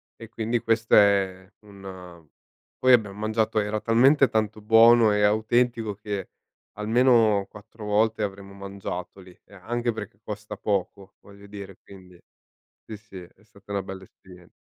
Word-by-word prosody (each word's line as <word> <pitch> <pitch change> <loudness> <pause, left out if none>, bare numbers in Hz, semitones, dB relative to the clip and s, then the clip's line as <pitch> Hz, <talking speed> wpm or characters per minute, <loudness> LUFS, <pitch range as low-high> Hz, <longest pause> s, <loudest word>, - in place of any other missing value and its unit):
E 115 -1 -12
quindi 115 +1 -2
questo 115 0 +1
è 95 -2 +2
un 95 -4 -12 0.5
poi 130 0 +5
abbiam 105 -4 +2
mangiato, 110 0 0
era 105 +1 -2
talmente 130 +5 +4
tanto 110 -1 -2
buono 115 +1 +6
e 105 0 +1
autentico 110 +1 +1
che 100 -2 -6 0.5
almeno 110 -2 +3
4 105 +1 -13
volte 110 +1 +1
avremmo 100 0 -6
mangiato 100 -1 -7
lì 90 -1 -16
e - - -22
anche 120 +5 -3
perché 105 -2 -9
costa 105 0 -7
poco 100 -1 -3
voglio 100 0 -16
dire, 100 -2 -10
quindi 90 -2 -16 0.7
sì 110 - -8
sì, 105 -3 -13
è 90 +4 -15
stata 100 -1 -21
una 100 -1 -1
bella 95 0 -9
esperien 90 -1 -18
105 Hz, 145 wpm, -25 LUFS, 100-110 Hz, 0.7 s, buono